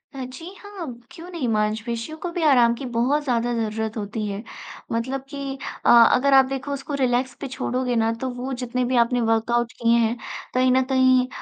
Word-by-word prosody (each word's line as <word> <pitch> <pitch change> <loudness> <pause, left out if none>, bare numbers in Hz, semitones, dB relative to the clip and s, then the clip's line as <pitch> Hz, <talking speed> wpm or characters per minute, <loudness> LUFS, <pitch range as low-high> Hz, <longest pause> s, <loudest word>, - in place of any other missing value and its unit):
अ, 265 - -5
जी 255 +6 -10
हाँ, 410 -4 -8 0.3
क्यों 340 +2 -11
नहीं, 320 -9 -3
मांसपेशियों 225 +6 -2
को 355 - -2
भी 345 - -3
आराम 245 -6 +5
की 265 - -7
बहुत 280 +6 +2
ज़्यादा 240 -2 0 0.2
ज़रूरत 220 +1 -4
होती 210 +1 -4
है। 200 +1 -5 0.5
मतलब 260 +4 -2
कि 275 -2 -5 0.3
अ, - - +4
अगर 250 +4 +6
आप 265 -1 +7
देखो 270 +1 -5
उसको 280 +1 -6
रिलैक्स 250 +1 +1
पे 275 - -3
छोड़ोगे 250 -1 -2
ना 225 0 +2
तो 260 - -1
वो 255 +2 -5
जितने 250 0 -1
भी 255 +1 -1
आपने 245 0 -1
वर्कआउट्स 235 +1 0
किए 235 0 +4
हैं, 230 +1 +1 0.4
कहीं 255 0 +3
न 260 - +4
कहीं 255 -1 +4
250 Hz, 195 wpm, -23 LUFS, 230-270 Hz, 0.5 s, आप